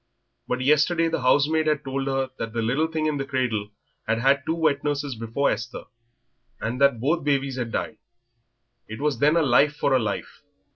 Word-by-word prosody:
But 125 - -2
yesterday 155 +4 +3
the 165 - -2
housemaid 150 +5 +3
had 150 -1 +1
told 135 0 -3
her 135 -1 -1
that 115 -1 -4
that 120 - -2
little 135 +8 +1
thing 160 -1 -2
in 155 -1 0
the 135 - -2
cradle 125 -6 -2 0.4
had 115 - +1
had 135 +3 +2
two 160 - +1
wet 155 -4 +1
nurses 145 -2 -2
before 115 +5 -1
Esther, 120 +3 -5 0.8
and 120 +4 -4
that 140 -4 +4
both 155 +6 0
babies 140 -2 0
had 120 -2 -3
died. 110 - -3 0.9
It 110 +1 -8
was 150 -1 -1
then 150 +3 +4
a 165 - +3
life 145 +2 +3
for 140 - +1
a 130 - +4
life. 105 -3 -4
140 Hz, 195 wpm, -24 LUFS, 125-150 Hz, 0.9 s, that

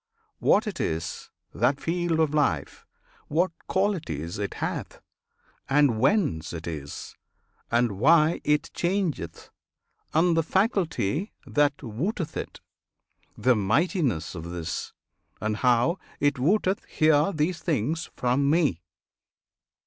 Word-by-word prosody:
[FN#27] - - -45 0.2
What 215 - +5
it 205 -5 -5
is, 80 0 -3 0.2
that 125 +8 +1
"field" 170 -1 0
of 155 -2 +2
life, 110 - 0 0.4
What 170 +5 +1 0.2
qualities 150 - -1
it 100 -2 -3
hath, - - -4 0.7
and 135 -5 +3
whence 130 - +1
it 85 -1 -6
is, 75 -4 -6 0.5
And 115 -4 +1
why 155 +5 +4
it 150 +2 +1
changeth, 175 - -2 0.6
and 165 +2 +3
the 165 - +4
faculty 190 - 0
That 145 0 +1
wotteth 155 - -3
it, - - -6 0.8
the 125 -1 +3
mightiness 115 - +1
of 80 -3 -7
this, 85 -1 -4 0.5
And 110 0 -1
how 125 - +2 0.2
it 145 -2 +1
wotteth 190 +6 +2
hear 155 +3 +3
these 160 +1 -1
things 160 - -1
from 125 +3 +1
Me! 145 - +2
145 Hz, 120 wpm, -26 LUFS, 110-170 Hz, 0.8 s, What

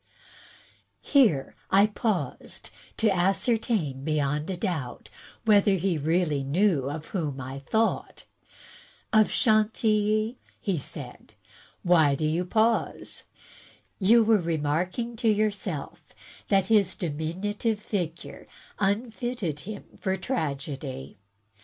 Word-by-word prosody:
Here 220 - +3
I 195 +2 +6
paused, 215 -2 -3 0.3
to 215 -4 +3
ascertain 190 - +1
beyond 150 0 0
a 185 - -2
doubt 165 - -4 0.3
whether 205 -2 +5
he 180 -3 0
really 155 -2 +1
knew 150 -1 +2
of 155 +2 -6
whom 150 -8 -3
I 135 +1 -6
thought. 220 +11 -1 0.4
— - - -18 0.3
"of 215 -1 +5
Chantilly," 215 +1 +2 0.4
said - - -8
he, - - -34 0.3
"why 160 -6 +4
do 155 - -2
you 165 +4 0
pause? 225 +5 0 0.7
You 225 +4 +6
were 220 -1 +4
re 165 -1 -1
marking 180 +11 -1
to 225 - +2
yourself 205 -7 -1 0.5
that 195 -2 +3
his 200 -3 +3
diminutive 190 +8 -2
figure 180 -6 -5 0.3
unfitted 215 - -1
him 210 +6 -7
for 190 -1 -1
tragedy." 140 - -4
190 Hz, 110 wpm, -27 LUFS, 155-215 Hz, 0.7 s, I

